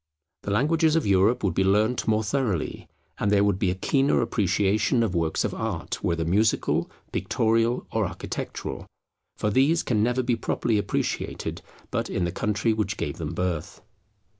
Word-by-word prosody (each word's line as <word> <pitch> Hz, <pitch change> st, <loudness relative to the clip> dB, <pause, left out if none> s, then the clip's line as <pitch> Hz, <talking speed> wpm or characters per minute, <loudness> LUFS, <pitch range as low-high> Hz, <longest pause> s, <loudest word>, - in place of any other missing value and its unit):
The -, -, -6 dB
languages 155 Hz, +8 st, +2 dB
of 165 Hz, -, +1 dB
Europe 100 Hz, +5 st, +3 dB
would 95 Hz, -4 st, +1 dB
be 95 Hz, -, +2 dB
learnt 105 Hz, +6 st, +2 dB
more 110 Hz, 0 st, +2 dB
thoroughly, 110 Hz, -, -2 dB, 0.3 s
and 105 Hz, -, +1 dB
there 100 Hz, 0 st, +4 dB
would 100 Hz, -2 st, +1 dB
be 95 Hz, -, +1 dB
a 90 Hz, -, -1 dB
keener 135 Hz, +8 st, +2 dB
appreciation 105 Hz, +3 st, +1 dB
of 105 Hz, -5 st, -1 dB
works 80 Hz, -2 st, 0 dB
of -, -, -2 dB
art, -, -, -4 dB
whether 85 Hz, -1 st, 0 dB
musical, 105 Hz, +6 st, +1 dB, 0.2 s
pictorial, 115 Hz, +2 st, +1 dB
or -, -, +1 dB
architectural; -, -, -6 dB, 0.5 s
for 105 Hz, -, 0 dB
these 140 Hz, +9 st, +3 dB
can 110 Hz, -4 st, +1 dB
never 125 Hz, +3 st, +1 dB
be 120 Hz, -1 st, +1 dB
properly 115 Hz, -1 st, 0 dB
appreciated -, -, -3 dB, 0.3 s
but -, -, -1 dB
in 90 Hz, -, -1 dB
the 85 Hz, -, -2 dB
country 105 Hz, +4 st, 0 dB
which 110 Hz, -1 st, -2 dB
gave -, -, -3 dB
them -, -, -4 dB
birth. 90 Hz, -4 st, -3 dB
105 Hz, 165 wpm, -25 LUFS, 95-120 Hz, 0.5 s, there